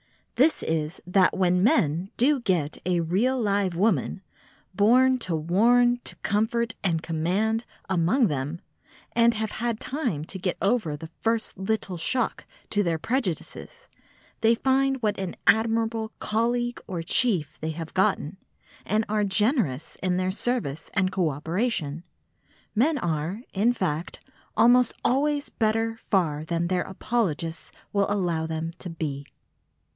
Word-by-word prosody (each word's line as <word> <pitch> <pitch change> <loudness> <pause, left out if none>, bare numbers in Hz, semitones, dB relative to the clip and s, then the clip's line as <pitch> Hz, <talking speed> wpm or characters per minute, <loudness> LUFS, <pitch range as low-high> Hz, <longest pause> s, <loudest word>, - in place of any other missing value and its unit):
This 290 +6 +3
is, 160 +1 -2
that 185 +1 +3
when 180 -1 +3
men 180 -4 +2
do 275 +3 +3
get 175 -10 -1
a 175 -2 +2
real 215 +11 +1
live 200 -5 0
woman, 190 - +1 0.5
born 255 +6 +4
"to 180 -7 -1
warn, 240 +10 +3
to - - -4
comfort 225 +2 0
and 165 -4 0
command" 195 +8 0 0.2
among 190 +8 +2
them, 145 -1 -2 0.5
and 235 0 +4
have 220 0 -2
had 230 -1 -2
time 240 - -2
to 190 - -7
get 180 0 -2
over 195 -8 0
the 160 +2 -10
first 225 -1 -1
little 190 -1 -2
shock 240 +8 -1 0.2
to 205 - +3
their 170 -4 0
prejudices, 255 - -3 0.5
they 230 +1 +4
find 270 +2 +1
what 210 -2 0
an 190 -2 -4
admirable 225 0 +2
colleague 240 +2 -1
or 175 -3 -4
chief 170 - +2
they 160 - -2
have 160 0 -6
gotten, 190 -4 +1 0.5
and 215 +2 0
are 210 0 +1
generous 205 - +1
in 180 -1 +1
their 185 0 0
service 210 - -3
and 185 -1 +2
co 185 -4 +1
operation. 160 - -2 0.7
Men 290 +8 +2
are, 170 - -2
in 210 +5 +3
fact, 175 -8 -3 0.4
almost 245 +2 +5
always 285 +2 +1
better 225 0 0
far 165 -9 0
than 170 +1 -1
their 180 +1 0
apologists 180 -6 -2 0.2
will 200 0 +1
allow 175 -5 0
them 160 +1 -3
to 180 - -6
be. 145 -4 -4
195 Hz, 140 wpm, -26 LUFS, 165-230 Hz, 0.7 s, almost